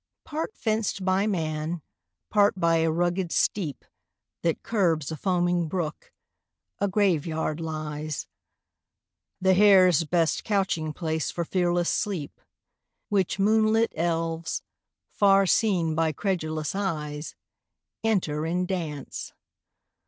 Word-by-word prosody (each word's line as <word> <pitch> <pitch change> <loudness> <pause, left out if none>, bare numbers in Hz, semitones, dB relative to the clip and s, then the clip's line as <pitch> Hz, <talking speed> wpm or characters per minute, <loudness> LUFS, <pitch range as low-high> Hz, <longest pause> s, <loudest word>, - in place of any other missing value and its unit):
] - - -63
Part 320 +7 -4
fenced 215 -4 -1
by 190 +2 +2
man, 160 -3 -2 0.5
part 205 -2 +3
by 165 -1 +3
a 165 0 +2
rugged 175 +2 0
steep 165 -10 -1 0.6
That 165 -2 -1
curbs 165 - +1
a - - -3
foaming 175 0 +1
brook, 170 -2 -4 0.7
a 200 - +2
Grave 190 -6 +2
yard 160 -1 -2
lies; 155 -2 -4 1.1
The 190 0 +4
hare's 185 -4 +6
best 165 -1 +1
couching 190 -7 0
place 160 -1 -2
for 170 - -3
fearless 175 -1 +1
sleep; 180 -9 -3 0.7
Which 195 -4 +1
moonlit 220 +2 +3
elves, 165 -1 -1 0.5
far 195 -1 +4
seen 180 -5 +2
by 160 0 +1
credulous 155 -4 -2
eyes, 150 -6 -3 0.7
Enter 175 -9 0
in 175 +3 0
dance. 160 -7 -5
175 Hz, 115 wpm, -26 LUFS, 160-195 Hz, 1.1 s, hare's